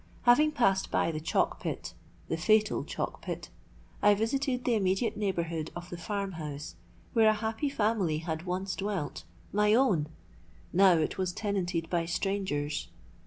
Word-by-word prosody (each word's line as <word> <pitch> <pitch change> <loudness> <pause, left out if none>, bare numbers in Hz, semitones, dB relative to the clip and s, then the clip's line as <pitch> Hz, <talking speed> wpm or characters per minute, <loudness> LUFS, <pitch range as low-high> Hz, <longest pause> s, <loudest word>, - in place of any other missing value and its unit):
Having 300 +6 +5
passed 195 -7 +2
by - - +1
the 155 - -3
chalk 155 - 0
pit—the 165 - -6
fatal 215 +5 +3
chalk - - -4
pit—I 205 0 -2
visited 250 +4 -1
the 245 - +3
immediate 195 +2 +1
neighbourhood 170 -6 -2
of 175 0 -8
the 175 - -5
farm 200 +2 -3
house 150 0 -6 0.4
where 225 -2 +6
a - - +5
happy 220 +6 -2
family 210 - +1
had 160 +1 -4
once 185 +1 -2
dwelt—my 195 - -1
own! 200 - +3 0.7
Now 190 +1 +7
it 160 +2 0
was 185 -1 0
tenanted 180 -5 -1
by 170 -2 +1
strangers. 170 -5 -1
190 Hz, 140 wpm, -30 LUFS, 165-215 Hz, 0.7 s, Now